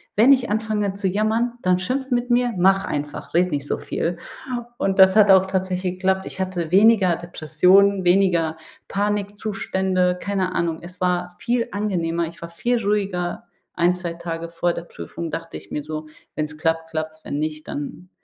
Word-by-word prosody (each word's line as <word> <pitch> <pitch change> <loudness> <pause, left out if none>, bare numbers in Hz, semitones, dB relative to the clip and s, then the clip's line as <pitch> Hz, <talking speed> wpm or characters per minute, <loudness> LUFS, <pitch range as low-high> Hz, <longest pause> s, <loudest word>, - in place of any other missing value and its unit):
Wenn 235 +7 +6
ich 250 -5 +3
anfange 210 -2 0
zu 200 -1 -1
jammern, 220 +5 +1
dann 185 0 +3
schimpft 260 +7 -2
mit 245 0 0
mir. 245 0 +2
Mach 195 +2 +4
einfach, 145 +1 -5
rede 180 +1 +3
nicht 145 -2 -2
so - - -1
viel.“ 170 +1 -2 0.6
Und 195 0 0
das 190 0 +7
hat 210 -2 +7
auch 190 0 +6
tatsächlich 185 -1 -1
geklappt. 190 0 0
Ich - - -9
hatte 180 -3 -2
weniger 195 -3 +5
Depressionen, 180 +4 +3
weniger 175 -3 +3 0.3
Panikzustände, 195 -3 -1
keine 190 -2 -1
Ahnung. 165 -1 0
Es 180 +1 -11
war 180 -1 0
viel 235 0 0
angenehmer. 170 -5 -1
Ich 170 - -11
war 170 - -6
viel 235 +7 -1
ruhiger. 195 -4 -1 0.3
Ein, 175 +1 +3
2 175 -2 -4
Tage 170 -1 -5
vor 170 +1 0
der 170 - -5
Prüfung 170 -1 -7
dachte 165 0 -5
ich - - -15
mir 150 - -3
so: 155 0 -5 0.3
Wenn's 150 0 -3
klappt, 165 0 -1
klappt's. 155 0 -4
Wenn 145 - -3
nicht, 155 0 -4
dann 145 +5 -6
185 Hz, 175 wpm, -22 LUFS, 170-200 Hz, 0.6 s, das